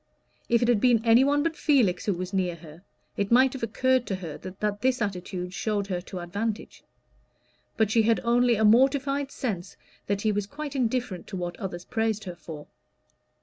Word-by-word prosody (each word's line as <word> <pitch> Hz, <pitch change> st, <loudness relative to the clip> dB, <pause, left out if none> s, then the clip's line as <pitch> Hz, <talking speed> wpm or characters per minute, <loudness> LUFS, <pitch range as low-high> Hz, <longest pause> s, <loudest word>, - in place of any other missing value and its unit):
If 235 Hz, 0 st, +3 dB
it -, -, +2 dB
had 235 Hz, -4 st, +3 dB
been 240 Hz, -2 st, +3 dB
any 230 Hz, +3 st, +6 dB
one 290 Hz, +1 st, +2 dB
but 330 Hz, 0 st, -1 dB
Felix 240 Hz, -, +2 dB
who 205 Hz, -, +3 dB
was 185 Hz, +2 st, -5 dB
near 180 Hz, -3 st, 0 dB
her, 165 Hz, 0 st, -13 dB, 0.4 s
it 200 Hz, +1 st, -1 dB
might 255 Hz, +2 st, +5 dB
have 265 Hz, -, -7 dB
occurred 255 Hz, +3 st, +1 dB
to 195 Hz, -, -1 dB
her 170 Hz, -5 st, -7 dB
that 205 Hz, +2 st, -4 dB
this 255 Hz, 0 st, +2 dB
attitude 180 Hz, -3 st, -4 dB
showed 205 Hz, 0 st, -1 dB
her 180 Hz, -3 st, -3 dB
to 185 Hz, +1 st, -8 dB
advantage; 205 Hz, +5 st, -4 dB, 0.9 s
but 220 Hz, -2 st, +2 dB
she 225 Hz, -, +4 dB
had 225 Hz, +1 st, +2 dB
only 240 Hz, 0 st, +3 dB
a 220 Hz, 0 st, +2 dB
mortified 270 Hz, +4 st, +3 dB
sense 205 Hz, -11 st, -4 dB, 0.3 s
that 200 Hz, 0 st, -1 dB
he 215 Hz, -, +2 dB
was 205 Hz, -1 st, -2 dB
quite 290 Hz, +3 st, -6 dB
indifferent 245 Hz, -7 st, -1 dB
to 190 Hz, -, -6 dB
what 175 Hz, -1 st, -4 dB
others 180 Hz, -4 st, -5 dB
praised 220 Hz, -1 st, -1 dB
her 180 Hz, -2 st, -7 dB
for. 155 Hz, -3 st, -9 dB
215 Hz, 190 wpm, -26 LUFS, 185-245 Hz, 0.9 s, any